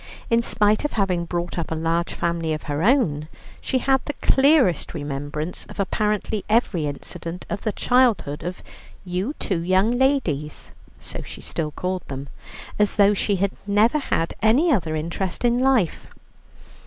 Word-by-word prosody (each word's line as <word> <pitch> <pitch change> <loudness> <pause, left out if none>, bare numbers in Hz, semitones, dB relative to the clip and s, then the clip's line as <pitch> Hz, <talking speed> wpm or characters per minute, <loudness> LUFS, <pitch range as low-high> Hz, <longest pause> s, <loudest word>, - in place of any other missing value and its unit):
In 230 0 +4
spite 215 -1 +2
of 295 - -2
having 185 -5 0
brought 175 0 -3
up 165 - -3
a 160 - -2
large 165 +2 0
family 170 -2 -1
of 155 - -4
her 145 0 -2
own, 175 - +2 0.3
she 260 - 0
had 265 0 +2
the 290 - -3
clearest 265 - +3
remembrance 145 +2 -4
of - - -12
apparently 210 +1 0
every 210 -8 +2
incident 165 +4 -6
of 205 - -2
the 215 - -1
childhood 235 - +2
of 180 +2 -6 0.4
"you 185 +10 -2
two 185 -5 -1
young 185 +5 +3
ladies" 245 - 0 0.3
(so - - -7
she - - -10
still 155 -2 -3
called 185 +4 -3
them) 135 0 -6 0.5
as 210 -1 +2
though 205 0 +5
she 205 0 0
had 195 +1 0 0.2
never 215 +8 +3
had 165 - -1
any 255 +11 +4
other 170 - +1
interest 170 +7 -3
in 240 0 +3
life. 255 -9 +2
190 Hz, 160 wpm, -23 LUFS, 165-230 Hz, 0.5 s, though